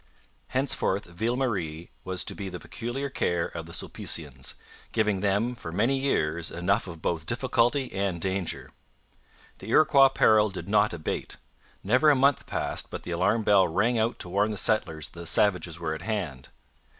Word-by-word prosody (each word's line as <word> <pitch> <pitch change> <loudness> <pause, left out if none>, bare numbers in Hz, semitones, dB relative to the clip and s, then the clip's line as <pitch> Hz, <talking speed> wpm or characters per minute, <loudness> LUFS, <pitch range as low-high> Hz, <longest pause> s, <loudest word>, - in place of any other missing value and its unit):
Henceforth 130 -6 0
Ville 110 +8 -2
Marie 90 -11 -2
was 95 -1 -2
to - - -3
be 100 -2 -5
the 90 -1 -7
peculiar 120 - -4
care 85 -10 0
of 80 -1 -7
the - - -10
Sulpicians, 70 -5 -3 0.4
giving 105 -3 +1
them 105 +5 +1
for 85 -9 -8
many 115 +10 +1
years 85 - 0
enough 90 +3 0
of 85 -3 -9
both 80 -2 -2
difficulty 125 +2 +1
and 95 -3 -1
danger. 95 -1 -3 0.9
The - - -10
Iroquois 140 -3 +6
peril 110 -3 +4
did 95 - -7
not 105 +1 +3
abate. 80 -3 -4 0.5
Never 125 +10 +4
a 145 - +6
month 135 +1 +2
passed - - -2
but - - -7
the - - -6
alarm 100 +6 +1
bell 100 -3 +5
rang 115 +8 +1
out 115 +2 0
to 90 - -7
warn 100 +4 +1
the 105 - -4
settlers 80 -8 0
that 85 - -13
the 85 - -7
savages 90 -5 +2
were 80 -2 -2
at 80 - -6
hand. 95 - -4
100 Hz, 175 wpm, -27 LUFS, 85-115 Hz, 0.9 s, Iroquois